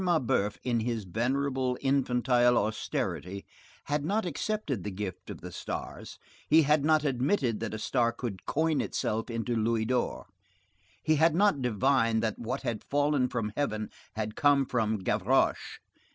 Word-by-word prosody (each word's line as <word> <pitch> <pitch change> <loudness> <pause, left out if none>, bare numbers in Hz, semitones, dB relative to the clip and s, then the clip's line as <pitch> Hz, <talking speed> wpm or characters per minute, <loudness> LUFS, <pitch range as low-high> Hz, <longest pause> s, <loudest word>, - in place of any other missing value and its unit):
Mabeuf, 125 - +1
in 120 -2 +1
his 115 -1 -2
venerable, 130 +5 -1
infantile 125 -2 +3
austerity, 95 -3 -2 0.4
had 145 0 -1
not 205 +7 0
accepted 165 - -2
the 105 - -3
gift 95 -1 -6
of - - -7
the - - -8
stars; - - -6 0.3
he 160 +1 +6
had 150 0 +3
not 155 0 +3
admitted 130 - +1
that 110 -2 -3
a - - -3
star 120 +2 +1
could 115 -6 -6
coin 160 0 +1
itself 110 +2 -2
into 115 +1 -2
louis 115 0 +1
d'or. 125 +1 -1 0.8
He 155 0 +3
had 160 +1 +4
not 195 -7 +3
divined 115 -1 +2
that 110 -2 -1
what 125 +4 -4
had 120 -4 -3
fallen 145 -2 +1
from 105 -4 -3
heaven 110 -7 -2 0.2
had 110 0 -4
come 145 -1 +4
from 110 -3 0
Gavroche. - - +1
125 Hz, 150 wpm, -29 LUFS, 110-145 Hz, 0.8 s, he